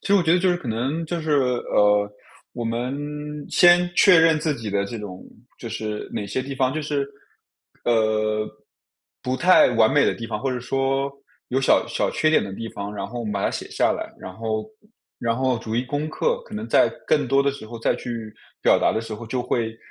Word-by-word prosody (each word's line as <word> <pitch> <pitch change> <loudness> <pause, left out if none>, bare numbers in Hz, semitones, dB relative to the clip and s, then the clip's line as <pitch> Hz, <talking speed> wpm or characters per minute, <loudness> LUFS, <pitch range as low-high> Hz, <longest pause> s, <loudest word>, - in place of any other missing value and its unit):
其 - - -10
实 200 - +5
我 195 - +5
觉 165 -1 +3
得 180 - +5
就 185 +1 +2
是 175 - +1
可 165 - -10
能 130 +9 -1
就 170 +1 -3
是， 155 -1 -1
呃， 105 -6 +2 0.4
我 120 - -5
们 120 +4 -2 0.5
先 175 0 +5
确 180 -3 +7
认 165 -1 +5
自 150 -1 0
己 115 -5 -6
的 100 0 0
这 115 +3 -6
种， 95 -3 -8 0.4
就 115 - -7
是 110 -1 -4
哪 100 - -3
些 115 +7 -2
地 135 +1 -6
方 130 -1 +1
就 155 - -2
是， 145 -2 -1 0.8
呃， 110 -2 +1 0.7
不 130 +1 -1
太 185 -1 +6
完 115 -2 +4
美 145 - +4
的 - - +2
地 115 - -6
方， 105 - -4
或 135 - -1
者 125 - -2
说 135 +2 -1 0.4
有 130 - 0
小 135 - +3
小 - - -1
缺 155 - +2
点 - - +4
的 100 - -6
地 115 +2 -6
方， 100 0 -6
然 100 -1 -4
后 120 +3 -6
我 115 - -4
们 105 - -3
把 100 -1 -1
它 - - +2
写 - - -5
下 - - +2
来， - - -5
然 95 - -9
后 110 +1 -3 0.5
然 115 -1 0
后 130 -2 +1
逐 115 0 -4
一 120 - +1
攻 145 +3 -3
克。 480 - 0
可 - - -10
能 - - -4
在 - - +4 0.2
更 145 -4 +2
多 135 +2 +4
的 140 - +2
时 135 -5 -10
候 115 +1 -8
再 115 - +1
去 115 -3 -6 0.3
表 - - +5
达 - - +2
的 110 - -1
时 115 -1 -6
候， 115 +2 -9
就 125 +2 -2
会 115 -2 -2
120 Hz, 250 characters per minute, -23 LUFS, 110-140 Hz, 0.8 s, 确